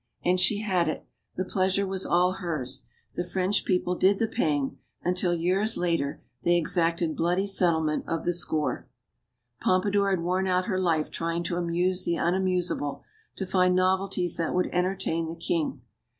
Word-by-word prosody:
And 180 Hz, +1 st, +3 dB
she 200 Hz, +3 st, +4 dB
had 185 Hz, -5 st, +1 dB
it. 155 Hz, -, -3 dB, 0.3 s
The 185 Hz, -, -2 dB
pleasure 190 Hz, +1 st, +1 dB
was 190 Hz, 0 st, -1 dB
all 180 Hz, +1 st, +3 dB
hers. 160 Hz, -9 st, -3 dB, 0.3 s
The 175 Hz, -, -2 dB
French 185 Hz, +2 st, 0 dB
people 180 Hz, -1 st, +1 dB
did 190 Hz, +2 st, +3 dB
the 225 Hz, -, +1 dB
paying; 150 Hz, -, -1 dB, 0.2 s
until, 180 Hz, 0 st, +1 dB
years 190 Hz, +6 st, +1 dB
later, 165 Hz, -5 st, -1 dB, 0.2 s
they 175 Hz, +6 st, +3 dB
exacted 170 Hz, -1 st, +1 dB
bloody 180 Hz, +4 st, +1 dB
settlement 165 Hz, -6 st, +1 dB
of 165 Hz, -1 st, -2 dB
the 175 Hz, -, +2 dB
score. 160 Hz, -3 st, -1 dB, 0.7 s
Pompadour 200 Hz, +2 st, +2 dB
had 190 Hz, -3 st, +1 dB
worn 185 Hz, +2 st, 0 dB
out 185 Hz, 0 st, +1 dB
her 190 Hz, -4 st, -1 dB
life 165 Hz, -4 st, +1 dB
trying 170 Hz, +1 st, -2 dB
to 170 Hz, -, -2 dB
"amuse 175 Hz, +2 st, 0 dB
the 170 Hz, -, 0 dB
unamusable," 180 Hz, -5 st, 0 dB, 0.3 s
to 190 Hz, -, -3 dB
find 180 Hz, -1 st, +3 dB
novelties 185 Hz, -1 st, +1 dB
that 165 Hz, 0 st, -1 dB
would 180 Hz, -, +1 dB
enter 180 Hz, +2 st, +1 dB
tain 165 Hz, -3 st, -2 dB
the 165 Hz, -, -5 dB
king. 165 Hz, -1 st, -2 dB
180 Hz, 165 wpm, -27 LUFS, 170-185 Hz, 0.7 s, she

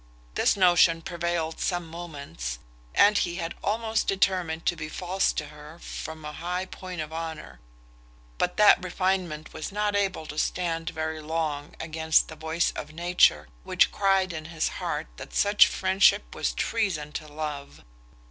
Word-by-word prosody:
This -, -, +2 dB
notion 175 Hz, -3 st, +5 dB
prevailed 170 Hz, -1 st, -2 dB
some 175 Hz, -2 st, -1 dB
moments, 140 Hz, -, -6 dB, 0.4 s
and 205 Hz, 0 st, +6 dB
he 175 Hz, -1 st, -1 dB
had 170 Hz, -1 st, -3 dB
almost 220 Hz, +1 st, 0 dB
determined 185 Hz, -4 st, +1 dB
to 175 Hz, -, +2 dB
be 155 Hz, -1 st, -6 dB
false 185 Hz, +4 st, 0 dB
to 150 Hz, -, -4 dB
her 150 Hz, +2 st, -12 dB
from 160 Hz, -2 st, -7 dB
a 150 Hz, -, -4 dB
high 180 Hz, +4 st, -3 dB
point 185 Hz, -2 st, -7 dB
of 155 Hz, +1 st, -6 dB
honour: 160 Hz, -, -6 dB, 0.8 s
but 180 Hz, -, 0 dB
that 210 Hz, -3 st, +6 dB
refinement 185 Hz, -4 st, -1 dB
was 160 Hz, +3 st, -5 dB
not 210 Hz, 0 st, 0 dB
able 195 Hz, -5 st, 0 dB
to 150 Hz, 0 st, -5 dB
stand 165 Hz, -1 st, -1 dB
very 160 Hz, -1 st, -4 dB
long 150 Hz, -2 st, -3 dB
against 160 Hz, 0 st, +2 dB
the 160 Hz, -, -8 dB
voice 160 Hz, +2 st, 0 dB
of 150 Hz, -, -7 dB
nature, 175 Hz, +2 st, +3 dB, 0.2 s
which -, -, +3 dB
cried 195 Hz, -2 st, +2 dB
in 155 Hz, -1 st, -6 dB
his 160 Hz, -1 st, -1 dB
heart -, -, -2 dB
that -, -, -9 dB
such 205 Hz, 0 st, +6 dB
friendship 190 Hz, -, +3 dB
was -, -, -1 dB
treason 175 Hz, -, -1 dB
to 155 Hz, +1 st, -6 dB
love. 150 Hz, -2 st, -6 dB
165 Hz, 155 wpm, -27 LUFS, 155-185 Hz, 0.8 s, and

